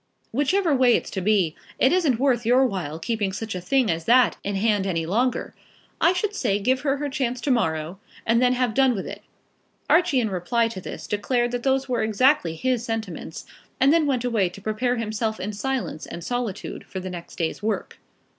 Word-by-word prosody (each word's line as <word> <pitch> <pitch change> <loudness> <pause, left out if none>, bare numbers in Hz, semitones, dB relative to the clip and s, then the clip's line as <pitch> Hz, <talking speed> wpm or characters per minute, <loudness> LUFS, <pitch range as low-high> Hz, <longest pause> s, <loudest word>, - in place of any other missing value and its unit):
Whichever 300 - +2
way 255 -2 +5
it's - - -2
to 190 - -3
be, 185 -5 +2 0.2
it 260 - +4
isn't 310 -10 +2
worth 255 -3 +2
your 250 +4 +4
while 175 - -3
keeping 205 +3 -1
such 220 +3 -5
a 180 - -4
thing 255 +3 +2
as 165 0 -3
that 245 0 +5
in 200 0 -2
hand 205 -1 +1
any 165 -3 -1
longer. 240 +9 0 0.5
I 335 - +6
should 385 +3 -1
say 225 - 0
give 255 +6 +1
her 280 -1 0
her 290 +1 -2
chance 260 -3 -2
to 285 - 0
morrow, 160 -6 0 0.3
and 230 +1 +3
then 250 0 +4
have 250 -3 0
done 265 0 +3
with 195 - -4
it." - - -7 0.7
Archie 320 -5 +4
in 220 -4 -1
reply 225 +6 +1
to 190 -5 -7
this - - -7
declared 240 +4 0
that 245 0 -2
those 270 +1 +1
were 245 -3 0
exactly 220 - +2
his 250 +5 0
sentiments, 220 -8 -5 0.3
and 270 +3 +5
then 325 -3 +3
went 255 -3 0
away 220 -7 +1
to 180 - -12
prepare 220 +4 -1
himself 220 -1 -2
in 205 +3 -4
silence 255 -6 -3
and 170 - -7
solitude 245 -2 -4
for 190 - -6
the 185 0 -6
next 175 -1 -8
day's 165 +2 -2
work. 215 +1 -3
230 Hz, 205 wpm, -24 LUFS, 195-260 Hz, 0.7 s, I